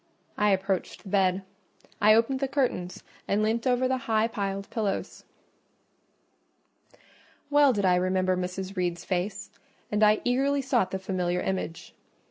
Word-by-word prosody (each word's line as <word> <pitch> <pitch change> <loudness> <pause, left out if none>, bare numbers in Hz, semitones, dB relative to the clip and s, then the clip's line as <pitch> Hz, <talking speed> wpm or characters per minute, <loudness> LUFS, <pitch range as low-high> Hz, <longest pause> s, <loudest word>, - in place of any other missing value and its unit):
I 210 0 +2
approached 190 -1 -1
the 195 - -10
bed; 190 -1 +2 0.6
I 215 +1 +7
opened 235 +4 +2
the 275 - 0
curtains 255 -10 -2 0.2
and 205 +2 +1
leant 230 +3 0
over 255 0 +2
the 260 0 0
high 220 0 +3
piled 200 -3 -4
pillows. 210 -4 -3 2.3
Well 290 -1 +6
did 205 -5 0
I 180 - +4
remember 185 0 +1
Mrs. 185 +2 -4
Reed's 175 -1 -2
face, 190 +2 -3 0.4
and 210 0 0
I 210 0 +5
eagerly 275 +3 +1
sought 245 -8 +1
the 190 - -3
familiar 180 -2 -2
image. 185 -3 -4
200 Hz, 140 wpm, -27 LUFS, 185-235 Hz, 2.3 s, I